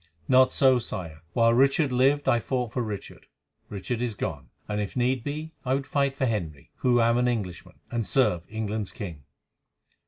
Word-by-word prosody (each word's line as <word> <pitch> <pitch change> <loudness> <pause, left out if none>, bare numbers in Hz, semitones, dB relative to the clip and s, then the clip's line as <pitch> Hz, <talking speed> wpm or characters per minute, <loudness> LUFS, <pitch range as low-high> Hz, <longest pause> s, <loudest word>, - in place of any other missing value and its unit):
"Not 130 0 +5
so, 130 -2 +4
Sire. 85 -9 -5
While 115 0 +4
Richard 135 +3 +3
lived 135 +3 +3
I 120 - +4
fought 125 -1 -2
for 125 - -1
Richard. 105 -4 -6 0.4
Richard 110 +4 -4
is 120 -3 -2
gone; - - -4 0.2
and, 105 0 -1
if 100 - -5
need 125 -1 +1
be, 155 +3 -5
I 130 +1 +1
would 135 0 -2
fight 140 -1 0
for 130 - +1
Henry, 85 - -3
who 125 -1 +3
am 115 +1 +3
an 125 - +2
Englishman, 100 -9 -3 0.2
and 120 -1 -1
serve 105 -7 +2
England's 110 -1 -3
king." 85 - -8
120 Hz, 180 wpm, -26 LUFS, 105-130 Hz, 0.4 s, Not